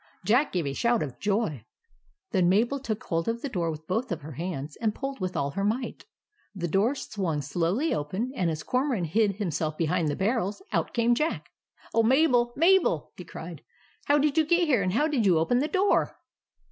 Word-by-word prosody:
Jack 250 +8 +3
gave 175 -4 -1
a 140 - -2
shout 235 +7 +1
of 135 -5 -7
joy. 200 - -1 0.7
Then 185 -5 +3
Mabel 235 +9 +2
took 220 -5 -4
hold 165 0 -2
of 230 +1 -2
the 280 - -2
door 175 -8 -1
with 155 0 -6
both 225 +9 -1
her 160 -4 -5
hands, 150 -1 -5
and 220 -2 -1
pulled 275 0 -5
with 185 -1 -3
all 140 0 -1
her 195 - -3
might. 230 +5 -2 0.5
The 175 -3 -2
door 205 - +2
swung 185 - -3
slowly 175 - 0
open, 190 - -2
and, 180 -6 0
as 160 -1 -4
Cormoran 255 -6 0
hid 200 +4 +1
himself 160 -6 -2
behind 165 0 +1
the 145 - -1
barrels, 210 - -1
out - - -1
came 235 0 +3
Jack. 305 +7 -2 0.2
" - - -26
Oh, 230 - +4
Mabel, 245 0 +3
Mabel! 370 +4 +3
" - - -10
cried - - -8
he. - - -35 0.2
" - - -33
How 290 - +4
did 295 +1 +2
you 315 - +3
get 345 +1 +3
here, 255 -8 +3
and 185 -1 0
how 295 +7 +2
did 285 -7 0
you 185 -5 +4
open 205 +10 +2
the 290 - +1
door?" 385 +5 +1
210 Hz, 210 wpm, -27 LUFS, 170-255 Hz, 0.7 s, Oh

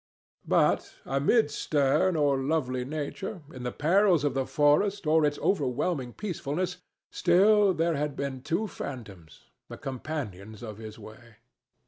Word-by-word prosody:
But - - +2
amid 145 - +2
stern 150 +5 +1
or 145 -3 +2
lovely 130 -3 -1
nature, 155 - -5
in 130 - -8
the 125 0 -3
perils 175 - +3
of 145 -3 +1
the 135 0 -1
forest 170 +7 +2
or 155 +1 +4
its 145 0 0
overwhelming 140 -5 -1
peacefulness, 180 -2 -3 0.3
still 200 +3 +4
there 165 +1 +1
had 145 0 -2
been 135 -2 -4
two 170 +10 -1
phantoms, 105 - -9 0.3
the - - -8
companions 115 - -6
of 110 -2 -7
his 110 -1 -9
way. 115 +1 -13
145 Hz, 135 wpm, -28 LUFS, 130-170 Hz, 0.3 s, or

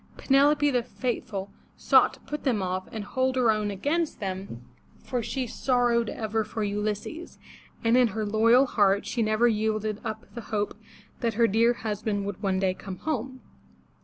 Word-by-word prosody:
Penelope 290 +2 +3
the 250 -2 +2
faithful, 220 -5 -4 0.3
sought - - +4
to - - -21
put 300 0 -6
them 230 -8 +1
off 185 0 -3
and 220 -2 -5
hold 260 +5 0
her 245 -3 +4
own 215 -1 -1
against 295 - -1
them, 190 - -5 0.4
for 250 -2 -2
she 260 +3 -3
sorrowed 240 -1 +1
ever 220 0 -2
for 215 +1 -4
Ulysses, 210 - -3 0.5
and 230 +1 +4
in 250 -1 +5
her 215 0 -3
loyal 230 +5 +4
heart 200 -5 +2
she 240 - -2
never 215 +2 +3
yielded 215 -1 -1
up 220 0 -5
the 235 - -6
hope 210 -1 -2 0.4
that 230 -3 -1
her 230 +1 +4
dear 230 +3 +3
husband 210 -3 -3
would 200 -1 -5
one 195 -2 0
day 190 -1 +1
come 190 0 -8
home. 260 - -4
220 Hz, 170 wpm, -27 LUFS, 205-245 Hz, 0.5 s, in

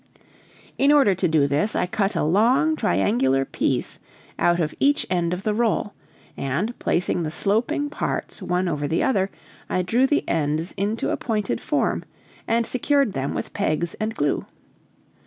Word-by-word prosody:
In 275 +2 +5
order 275 -9 +5
to 185 0 0
do 155 -3 +3
this, 145 +10 0
I - - +1
cut 195 +3 -1
a - - +1
long 235 - +3
triangular 130 - +1
piece - - -2 0.4
out 175 0 +3
of 155 -3 -1
each 285 +1 +2
end 175 -2 +1
of 180 +2 -3
the 215 - 0
roll, 215 -2 0 0.4
and, 155 - -2
placing 175 0 0
the 160 - -2
sloping 220 - 0
parts 290 - -3
one 180 +1 0
over 150 -3 -1
the 160 - 0
other, 195 -7 +1 0.4
I 185 - 0
drew 240 +9 +2
the 295 - 0
ends 160 +2 0
into 210 +3 -2
a - - 0
pointed 215 -3 -2
form - - 0 0.4
and 230 0 +2
secured 270 -2 +1
them 135 +1 -2
with - - -5
pegs 165 +2 -1
and 220 +1 -2
glue. 145 -4 -1
185 Hz, 165 wpm, -23 LUFS, 155-230 Hz, 0.4 s, In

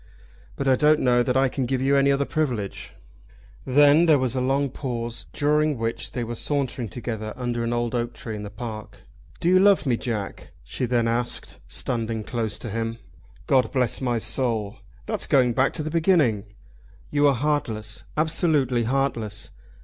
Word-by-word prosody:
"But 140 - -3
I 130 - +5
don't 150 +3 +4
know 120 -1 +3
that 125 +1 +1
I 135 0 +4
can 130 -1 -2
give 130 0 0
you 135 +2 +2
any 140 0 +4
other 140 0 +1
privilege." 125 -12 -3 0.7
Then 145 +5 +5
there 155 -2 +6
was 130 -2 -1
a 130 - 0
long 135 +1 +1
pause 120 -4 -4
during 150 0 +1
which 115 0 -3
they 120 - -2
were 120 +1 -4
sauntering 130 -2 -2
together 110 -2 -5
under 120 -2 -2
an 115 - -1
old 120 0 -1
oak 120 -1 -2
tree 110 -2 -6
in 105 - -6
the 105 - -6
park. 110 -1 -8 0.4
"Do - - -1
you 185 +1 +6
love 200 -2 +4
me, 125 -4 +1
Jack?" 110 -6 -5
she 90 - -3
then 120 -1 +1
asked, 120 +1 -2
standing 115 - -2
close 110 -2 -2
up - - -8
to 120 - -4
him. 115 +1 -3 0.5
"God 130 -4 +2
bless 125 -3 0
my 120 -2 0
soul! 110 -1 0 0.3
That's 215 -2 -3
going 125 -4 +3
back 130 +3 +2
to 155 - -3
the 155 - -4
beginning." 155 - +2 0.7
"You 145 0 +4
are 140 - +3
heartless, 115 -6 -2
absolutely 150 -6 +2
heartless. 120 -5 -1
125 Hz, 180 wpm, -24 LUFS, 115-140 Hz, 0.7 s, there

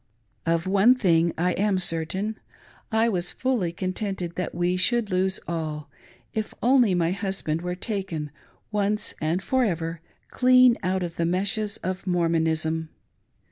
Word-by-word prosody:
Of 165 +1 +1
one 200 +6 +5
thing 170 -8 +3
I 180 +2 +1
am 200 0 +1
certain, 185 +5 0 0.2
— - - -28
I 220 +1 +3
was 180 -5 -1
fully 245 -10 -1
contented 185 -1 -3
that 180 - -4
we 175 +1 +1
should 215 +3 +1
lose 185 +1 +1
all, 155 -3 -4 0.4
if 220 -2 -3
only 245 -6 +4
my 170 -1 +1
husband 190 -5 -2
were 180 0 -3
taken, 180 - -4 0.4
once 210 0 0
and 165 +5 0
for 260 +3 +1
ever, 165 -5 -2 0.3
clean 255 -1 +6
out 185 0 0
of 170 -1 -5
the 170 - +1
meshes 200 +4 -1
of 185 +1 -4
Mormonism. 160 -2 0
185 Hz, 145 wpm, -25 LUFS, 165-210 Hz, 0.4 s, clean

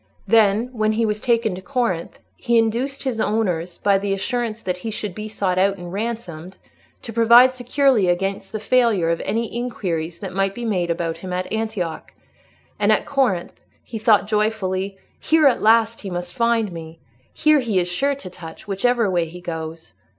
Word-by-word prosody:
Then, 220 +1 +3
when 215 -2 +1
he 225 +1 +1
was 210 -1 -2
taken 230 -4 +1
to 185 - -7
Corinth, 185 -3 -2 0.2
he 235 -1 +1
induced 235 +5 0
his 255 -5 -2
owners, 180 -6 -1
by 200 -1 +2
the 200 0 -1
assurance 230 +2 -3
that 180 -1 -2
he 200 +5 -5
should 210 -3 -4
be 215 +3 -6
sought 190 -4 -1
out 195 +1 +2
and 175 0 -8
ransomed, 195 -5 -5 0.5
to 230 - -7
provide 235 +3 +6
securely 255 -4 +2
against 195 +2 -1
the 215 - -4
failure 215 -7 +2
of 170 - -1
any 225 +2 -2
inquiries 175 -9 -3
that 190 0 -7
might 195 +1 0
be 240 - -5
made 180 -6 0
about 165 -1 -2
him 185 +2 -8
at 185 +2 -3
Antioch; 215 -7 -3 0.7
and - - +3
at - - +2
Corinth 245 -11 -1 0.2
he 225 - -7
thought 215 -2 +4
joyfully, 200 -3 -1 0.2
"Here, 320 -1 +3
at 270 - +4
last, 225 +1 +3
he 200 - -6
must 175 0 -5
find 230 -1 +1
me. 165 -1 -9 0.3
Here 305 -1 +3
he 230 -7 -1
is 180 -1 +2
sure 275 +11 0
to 265 -9 -9
touch, 165 +2 -11
whichever 230 +3 +1
way 175 -3 +1
he 170 +2 -10
goes." 165 -1 -7
210 Hz, 185 wpm, -21 LUFS, 180-230 Hz, 0.7 s, provide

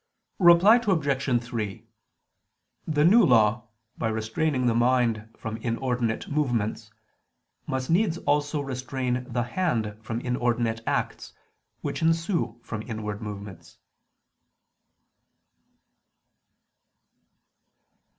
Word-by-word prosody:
Reply 180 +5 +7
Obj. 140 - +1
3: 110 -4 -5 1.0
The 150 -1 +2
New 215 +7 +7
Law, 120 - +3 0.3
by 115 - 0
restraining 110 +5 -1
the 120 - +3
mind 120 -2 +1
from 110 0 -5
inordinate 120 0 -2
movements, 120 -7 -1 0.8
must 130 +2 -2
needs 175 -1 +2
also 145 -1 0
restrain 130 -1 -3
the 120 0 0
hand 120 - -1
from 110 +1 -4
inordinate 120 -2 -1
acts, - - -2 0.5
which - - -4
ensue 165 - 0
from 110 -2 -5
inward 110 -2 -5
movements. 100 -3 -9
125 Hz, 90 wpm, -26 LUFS, 110-150 Hz, 1.0 s, Reply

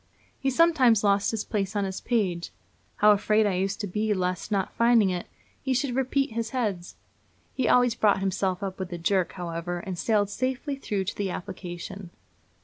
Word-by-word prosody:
He 270 - 0
sometimes 265 -8 +4
lost 200 -1 +3
his 225 -2 -2
place 200 -2 -2
on 205 - +1
his 190 -1 -4
page. 185 -8 -1 0.4
How 210 0 +6
afraid 210 +1 +3
I 205 - +1
used 195 +2 -1
to - - -2
be 210 +3 0
lest, 180 +2 -2
not 195 -2 0
finding 230 -4 +4
it, 180 -1 -4 0.3
he 265 -1 0
should 260 0 0
repeat 265 +1 0
his 230 0 -3
heads! 205 -9 -3 0.6
He 260 - 0
always 245 -1 +4
brought 210 -4 +3
himself 190 0 -1
up 190 -1 -4
with 190 -1 -5
a 175 - -4
jerk, 185 +2 +1
however, 175 -1 -4
and 180 0 -6
sailed 205 -3 +1
safely 260 +5 -2
through 205 -7 -2
to 190 - -4
the 200 -2 -2
application. 185 0 -7
205 Hz, 185 wpm, -26 LUFS, 185-235 Hz, 0.6 s, How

